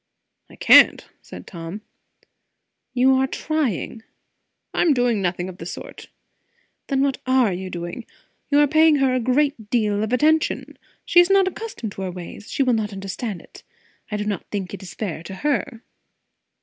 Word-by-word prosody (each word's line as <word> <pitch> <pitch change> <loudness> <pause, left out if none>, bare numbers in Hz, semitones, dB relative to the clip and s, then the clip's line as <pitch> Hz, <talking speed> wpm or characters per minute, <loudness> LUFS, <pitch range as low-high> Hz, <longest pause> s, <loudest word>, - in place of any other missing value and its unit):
"I - - -15
can't," - - +6
said - - -11
Tom. 170 +3 -8 1.1
"You 260 +1 +4
are 265 0 +2
trying." 270 - -2 0.7
"I - - +1
am 320 -5 +4
doing 245 -4 +1
nothing 180 -1 -1
of 185 -1 -10
the 165 - -7
sort." - - -9 0.8
"Then 270 -2 +1
what 275 -1 0
are 255 -6 +3
you 185 +1 -5
doing? 175 +6 -6 0.4
You 290 0 +4
are 295 - +5
paying 315 +1 +5
her 270 -2 +2
a 255 - +1
great 255 -2 0
deal 210 -3 +1
of 220 +1 -2
attention. 310 +5 +1 0.3
She 350 - +5
is 350 +1 +5
not 390 -1 +4
accustomed 380 - -5
to 195 - -8
our 185 -1 -3
ways; 180 +3 -9
she 275 - +1
will 255 -2 +2
not 215 -2 -1
understand 195 0 -5
it. - - -16 0.5
I 210 - -2
do 210 - -2
not 205 -4 -2
think 195 -3 -4
it 200 - -7
is 190 - -10
fair 180 -7 -4
to 190 +3 -8
her." 270 -2 -2
230 Hz, 175 wpm, -22 LUFS, 195-275 Hz, 1.1 s, can't